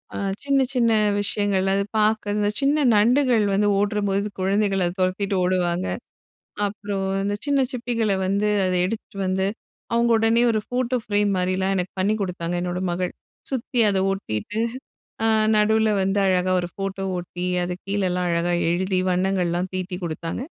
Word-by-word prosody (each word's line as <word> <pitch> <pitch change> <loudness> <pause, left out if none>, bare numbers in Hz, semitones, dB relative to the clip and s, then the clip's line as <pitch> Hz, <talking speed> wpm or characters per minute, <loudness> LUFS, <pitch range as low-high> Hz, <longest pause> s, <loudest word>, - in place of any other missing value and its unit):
ஆ - - -3 0.3
சின்ன 275 -1 +2
சின்ன 235 -2 +3 0.3
விஷயங்கள், 200 -2 0
அது 200 - +1 0.2
பாக்க. 215 -1 +1
இந்த 205 - +1
சின்ன 285 +1 +2
நண்டுகள் 240 0 +3
வந்து 205 +1 +2
ஓடுறபோது 205 -1 0
குழந்தைகள் 195 0 +1
அதை 175 - -1
துரத்திட்டு 195 +2 0
ஓடுவாங்க. 180 0 0 0.8
அப்புறம், 200 -1 -4 0.2
அந்த 205 +1 -1
சின்ன 285 -1 +2
சிப்பிகளை 230 -5 -1
வந்து 200 +2 +1 0.2
அதை 185 0 +1
எடுத்துட்டுவந்து, 190 -2 -2 0.5
அவுங்க 235 0 +3
உடனே 225 +1 +3
ஒரு 215 - +1
ஃபோட்டோ 250 0 0
ஃப்ரேம் 205 -1 +1
மாரிலாம் 185 +1 0
எனக்கு 180 0 -2
பண்ணி 200 +3 +2
குடுத்தாங்க, 175 -2 -3
என்னோட 180 0 -2
மகள். 180 +1 -2 0.4
சுத்தி 250 -2 -2
அதை 195 -1 +1
ஒட்டீட்டு, 195 - -4 0.7
ஆ - - +4 0.3
நடுவில 220 +1 +3
வந்து 195 +2 +1
அழகா 185 0 +2
ஒரு 175 - -3
ஃபோட்டோ 195 0 -4
ஓட்டி, 180 0 -5 0.2
அது 180 0 -2
கீழேலாம் 185 -3 0
அழகா 170 +1 0 0.2
எழுதி, 185 +2 0
வண்ணங்கள்லாம் 180 -1 0
தீட்டிக் 185 0 -4
குடுத்தாங்க. 165 +7 -4
195 Hz, 145 wpm, -23 LUFS, 185-215 Hz, 0.8 s, ஆ